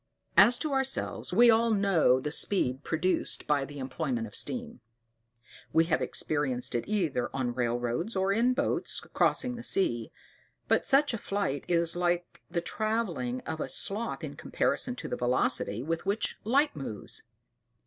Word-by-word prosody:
As 240 +1 +7
to 305 +1 -2
ourselves, 270 0 -1
we 235 +5 +6
all 230 +1 +3
know 195 - +3
the 150 +3 -4
speed 150 -7 +1
produced 165 +3 0
by 145 -2 +1
the 145 +1 -10
employment 130 -3 -3
of 105 - -11
steam; 240 - -2 0.9
we 165 - +5
have 165 -1 0
experienced 130 -5 0
it 120 - -1
either 165 -12 0
on 125 -3 -1
railroads, 120 - -1
or 190 +1 +1
in 240 +4 +3
boats 285 +1 -1
when - - -18
crossing 255 - +2
the 240 -1 -6
sea; 120 - +1 0.6
but - - +2
such 280 -1 +4
a 230 - -3
flight 200 -11 -2
is 170 -1 +1
like 175 0 -1
the 170 0 -1
travelling 175 - -2
of 160 0 -5
a - - -3
sloth 215 +4 0
in - - -6
comparison 250 0 -1
with - - -7
the - - -1
velocity 120 -2 0
with 165 +3 -2
which 205 +3 0
light 280 +7 +2
moves. 130 -8 -5
170 Hz, 160 wpm, -29 LUFS, -, 0.9 s, As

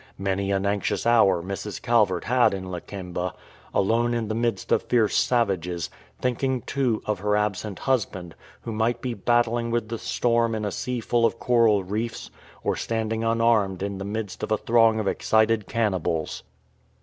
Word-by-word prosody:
Many 95 0 -1
an 100 0 0
anxious 100 +2 -1
hour 100 -7 +4
Mrs. 100 +2 -5
Calvert 105 -7 +2
had 125 -4 +3
in 95 -1 -6
Lakemba, 90 0 -5 0.4
alone 115 +4 +2
in 115 -3 -2
the - - -1
midst 115 -3 -1
of - - +4
fierce 115 -4 +1
savages, 90 -8 0 0.3
thinking, 130 0 0
too, 130 -6 -1
of 105 -3 -1
her 105 +1 +1
absent 105 -1 -2
husband, 95 - -1 0.3
who 115 - -6
might 115 +2 0
be 125 0 -3
battling 120 +2 +1
with 115 -2 -1
the 115 -1 -4
storm 115 -1 +1
in 105 -1 -3
a 105 - -2
sea 125 +4 -3
full 120 +1 +1
of 115 - +2
coral 115 -5 +3
reefs, 110 +5 -4 0.3
or - - 0
standing 110 0 -2
unarmed 115 -5 +2
in 100 -1 -3
the - - -4
midst 105 0 -5
of 110 - -4
a 110 - +3
throng 115 0 +3
of 105 - -2
excited 110 0 +2
cannibals. 95 -8 -1
110 Hz, 170 wpm, -25 LUFS, 100-115 Hz, 0.4 s, hour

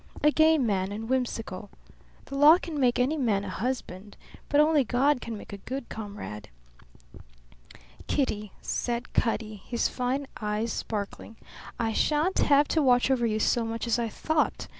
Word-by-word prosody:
A 300 - +6
gay 315 +1 +5
man 200 -7 0
and 220 +2 -5
whimsical. 225 -6 -2 0.6
The - - -11
law 295 +4 +8
can 330 -5 -5
make 250 -2 +3
any 265 +6 +1
man 215 -8 +1
a 200 - -5
husband, 205 -3 -4 0.3
but 290 - +3
only 300 -1 +4
God 255 +4 +2
can 230 -2 -5
make 205 - -11
a - - -5
good 265 +4 -6
comrade." 200 - -7 1.6
"Kitty," 210 -8 -1
said 240 -1 -3
Cutty, 220 -2 -1
his 235 -1 -1
fine 260 +3 -2 0.2
eyes 210 +2 -1
sparkling, 210 +1 -5 0.4
"I 225 -1 0
shan't 310 - +1
have 285 0 +4
to 320 - +2
watch 250 -1 +4
over 240 -3 +2
you 215 -1 -1
so 235 +2 +2
much 225 +1 -3
as 235 0 +1
I 230 -1 -1
thought. 310 +7 -1
240 Hz, 160 wpm, -27 LUFS, 215-280 Hz, 1.6 s, law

